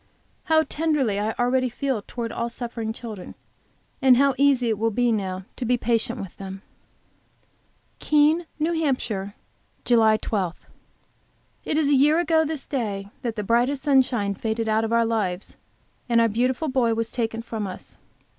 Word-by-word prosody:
How 315 0 +4
tenderly 290 -9 0
I 215 +2 -1
already 255 +1 +1
feel 260 -2 -2
towards 230 +2 -5
all 235 0 -2
suffering 230 -2 -5
children, 220 -4 -8 0.7
and 260 -2 +6
how 275 +1 +4
easy 270 -2 +3
it 215 -2 -1
will 225 +1 +2
be 240 +2 +1
now 190 -3 -2
to - - -4
be 245 +1 +2
patient 230 0 0
with 195 -3 -7
them! 195 0 -8 1.4
KEENE, 305 +3 +3
N. 330 +3 0
H. 275 -7 0 0.7
JULY 220 -3 +4
12. 190 -6 -3 1.0
It 300 - 0
is 305 -3 +2
a - - +4
year 290 +4 +5
ago 330 -2 +3
this 310 -2 -4
day 205 -7 -3
that 235 -3 -3
the 210 - -3
brightest 245 +6 +1
sunshine 250 -8 +2
faded 220 +2 -2
out 220 +1 +2
of 225 - -2
our 230 0 +3
lives, 205 -5 -2 0.5
and 235 -1 +4
our 230 - +5
beautiful 250 +7 0
boy 250 -4 +1
was 225 0 -2
taken 225 -1 -2
from 220 -3 -4
us. 185 - -10
235 Hz, 165 wpm, -24 LUFS, 220-270 Hz, 1.4 s, and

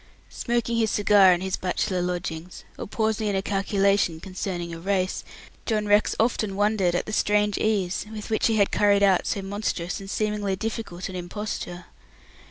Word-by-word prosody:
Smoking 235 -1 -1
his 225 -1 +2
cigar 205 -2 +5
in 175 0 +2
his 190 0 -2
bachelor 185 0 -1
lodgings, 175 -1 -4 0.2
or - - -5
pausing 220 0 0
in 200 - 0
a 190 - 0
calculation 195 -3 +1
concerning 180 -1 -4
a 165 - -6
race, 185 +1 -1 0.4
John 215 -2 +1
Rex 205 +1 +3
often 220 -3 +1
wondered 205 -3 +2
at - - 0
the 215 - -6
strange 210 -1 +2
ease 200 -3 0
with 215 0 -7
which 220 - +2
he 225 - +1
had 200 -2 +3
carried 200 -1 +3
out 190 -2 +4
so 200 - -1
monstrous 195 -3 -3
and 195 0 -9
seemingly 210 -2 -1
difficult 215 -3 -4
an 190 - -7
imposture. 180 -1 -5
200 Hz, 175 wpm, -25 LUFS, 185-210 Hz, 0.4 s, cigar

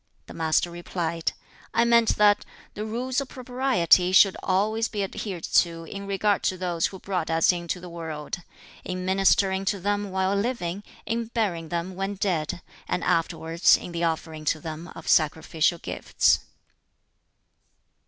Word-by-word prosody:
The - - -11
Master 160 +1 +1
replied, 170 -1 -3 0.4
"I 235 - +4
meant 235 -1 +4
that 205 -1 +5 0.3
the 210 - -5
Rules 250 +4 -1
of 275 - -7
Propriety 245 -9 +2
should 195 0 +6
always 215 +4 +1
be 205 -2 -3
adhered 190 -3 -5
to 165 -1 +2
in 200 +4 -7
regard 200 +1 +1
to 185 - +1
those 175 -2 0
who 190 - -9
brought 185 -3 -3
us 165 +2 +4
into 175 0 -3
the 180 - -9
world: 160 -3 -5 0.5
in 185 0 -4
ministering 190 0 +3
to 200 0 0
them 205 +2 -1
while 190 +1 0
living, 200 -4 -2 0.2
in 230 +1 -1
burying 200 -8 -2
them 175 +2 -3
when 195 +2 -3
dead, 175 -4 -2 0.2
and 180 - -1
afterwards 165 0 +3
in - - -8
the 170 0 -3
offering 160 -1 -2
to 155 - +1
them 160 +2 -7
of - - -10
sacrificial 160 +2 +2
gifts." - - +1
185 Hz, 155 wpm, -25 LUFS, 170-205 Hz, 0.5 s, should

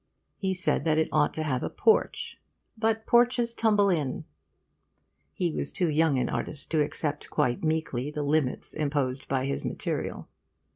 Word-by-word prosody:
He 190 -2 0
said 185 -5 +2
that 155 -1 +2
it 160 - +2
ought 150 -1 +3
to 155 - -1
have 130 -5 -1
a - - -2
porch 445 - +1 0.3
'but 225 0 0
porches 240 0 +3
tumble 210 -4 +3
in.' 150 -7 -1 1.1
He 175 -2 -1
was 140 - -3
too 175 -4 0
young 155 -2 +3
an 125 - +1
artist 150 - -4
to 160 -2 +3
accept 145 0 -3
quite 120 +3 0
meekly 155 -4 -1
the 150 0 -3
limits 145 -2 +1
imposed 140 -3 -1
by 130 -1 0
his 140 - -2
material. - - -3
155 Hz, 160 wpm, -27 LUFS, 140-190 Hz, 1.1 s, ought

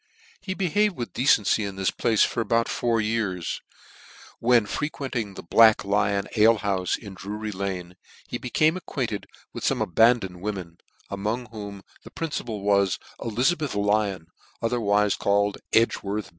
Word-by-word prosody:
393 - - -9
He - - +1
behaved 195 +1 +1
with 120 -2 -5
Hecency 115 -4 +3
in 100 -1 -4
this 95 -1 0
place 115 -3 +2
for - - 0
about 115 +1 +1
four 115 -2 0
years, 105 -5 -2 0.8
when 120 -2 +4
frequenting 125 -6 -3
the - - -8
Black 110 +4 +5
Lion 100 0 +1
alehoufe 105 -4 +3
in 100 -3 -10
Drury 105 +3 -5
Lane, 95 -3 -4 0.3
he - - -4
became 155 +6 +2
acquainted 125 - -4 0.3
with - - -7
fome - - +1
abandoned 95 -2 +2
women, 95 -5 -5 0.3
among 105 +5 -2
whom 100 -3 -8 0.2
the - - -11
principal 120 -10 -4
was 100 -2 +3 0.2
Elizabeth 130 +5 0
Lyon, 100 -4 +1 0.4
otherwife 105 -3 +1
called 100 0 +1
Edgworth. 105 -2 +1
105 Hz, 140 wpm, -25 LUFS, 100-115 Hz, 0.8 s, Black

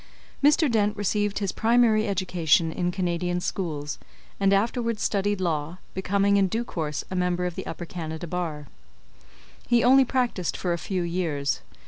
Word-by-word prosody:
Mr. 300 +2 +5
Dent 210 -2 +1
received 205 0 0
his 200 -2 -1
primary 225 -1 +3
education 175 -5 +2
in 175 +2 -1
Canadian 175 -1 -1
schools, 155 -6 -3 0.4
and 195 -1 +3
afterwards 230 +2 +1
studied 205 0 0
law, 165 -2 -2 0.2
becoming 200 +2 +2
in 195 -1 +4
due 225 +6 -1
course 155 -7 -3
a - - -2
member 180 0 0
of 180 - -2
the - - -6
Upper 175 - -5
Canada 160 -1 -6
Bar. 165 -4 -4 1.0
He 240 -1 +3
only 265 +2 +7
practised 245 -9 -1
for 175 -2 -1
a 170 - -3
few 185 +2 -2
years. 165 -5 -1
185 Hz, 155 wpm, -25 LUFS, 170-205 Hz, 1.0 s, only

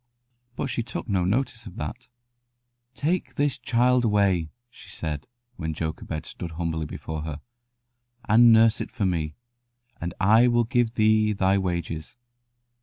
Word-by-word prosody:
But - - -2
she 130 -3 -2
took 120 +2 -6
no 95 -5 +1
notice 120 +3 -1
of 90 - -10
that. 120 +1 -6 0.9
"Take 165 +9 -1
this 145 -1 0
child 125 +1 +2
away," 100 -7 +2 0.2
she - - -15
said, 75 -2 -5 0.3
when 80 -2 -3
Jochebed 80 -1 -4
stood 85 -2 -7
humbly 80 -1 -2
before 80 +1 -6
her, 75 -1 -5 0.9
"and 115 +2 +7
nurse 115 0 +5
it - - -4
for 110 -6 -2
me, 80 -5 -1 0.6
and 85 +1 -4
I 110 +5 +5
will 120 -1 +3
give 120 -1 0
thee 110 -1 +3
thy 95 0 +2
wages." 85 -3 -3
105 Hz, 145 wpm, -25 LUFS, 85-120 Hz, 0.9 s, and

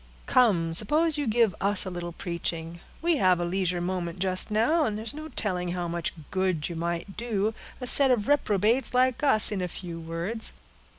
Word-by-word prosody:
"Come, 180 -10 +2
suppose 300 - +4
you 290 - -2
give 225 -3 +2
us 200 0 +3
a 185 - -5
little 175 -1 -6
preaching; 170 -1 -5 0.2
we 335 -2 +2
have 185 -6 +3
a 175 - -1
leisure 180 0 -1
moment 175 -1 -4
just 185 +1 0
now, 235 +10 +2
and 215 -6 -2
there's 220 +3 -3
no 310 +1 -8
telling 180 - -3
how 175 -1 -3
much 170 0 -3 0.2
good 185 -5 -1
you 170 - -6
might 170 +3 -4
do 220 -2 -2 0.3
a 250 - -6
set 270 +2 +8
of 230 -5 +1
reprobates 235 -2 +1
like 255 +1 +2
us, 220 -8 +4
in 200 -3 -3
a 180 - -2
few 170 -1 -8
words. 170 +7 -5
195 Hz, 190 wpm, -26 LUFS, 175-235 Hz, 0.3 s, set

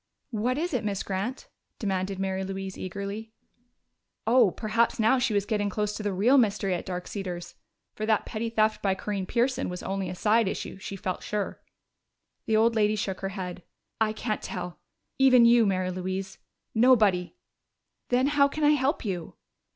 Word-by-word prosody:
"What 240 +4 0
is 340 +2 -2
it, 250 - 0
Miss 200 -2 -2
Grant?" 200 +7 -3 0.3
demanded 195 -2 -2
Mary 190 0 -1
Louise 195 0 -5
eagerly. 200 +4 -6 0.9
Oh, 235 -2 +5
perhaps 225 +6 0
now 225 +4 +4
she 235 -4 +1
was 200 -1 +1
getting 205 -1 0
close 210 +1 -1
to - - -5
the 205 -1 -1
real 230 +9 +4
mystery 200 -4 +1
at 175 - -4
Dark 180 -1 -4
Cedars! 180 -4 -5 0.4
For 215 - -4
that 220 -2 +2
petty 230 +1 -3
theft 215 -1 +1
by 195 -2 +1
Corinne 195 -1 -3
Pearson 255 +4 0
was 180 0 -6
only 195 -1 -2
a 180 - -5
side 215 +3 +3
issue, 190 - -4
she 195 - -6
felt 185 -1 -3
sure. 210 -1 -3 0.9
The 220 -1 +3
old 230 +1 +4
lady 215 -1 +2
shook 195 -3 -3
her 195 - -3
head. 185 -2 -6 0.4
"I 220 -1 +2
can't 215 0 -3
tell 180 -1 -6 0.4
even 255 -3 +7
you, 235 -2 +6
Mary 185 -1 0
Louise! 190 +1 -4 0.3
Nobody!" 215 -7 +4 0.7
"Then 250 +1 +3
how 285 0 +4
can 305 +2 -4
I 295 - +6
help 280 -2 +1
you?" 180 -5 -4
210 Hz, 175 wpm, -27 LUFS, 190-230 Hz, 0.9 s, even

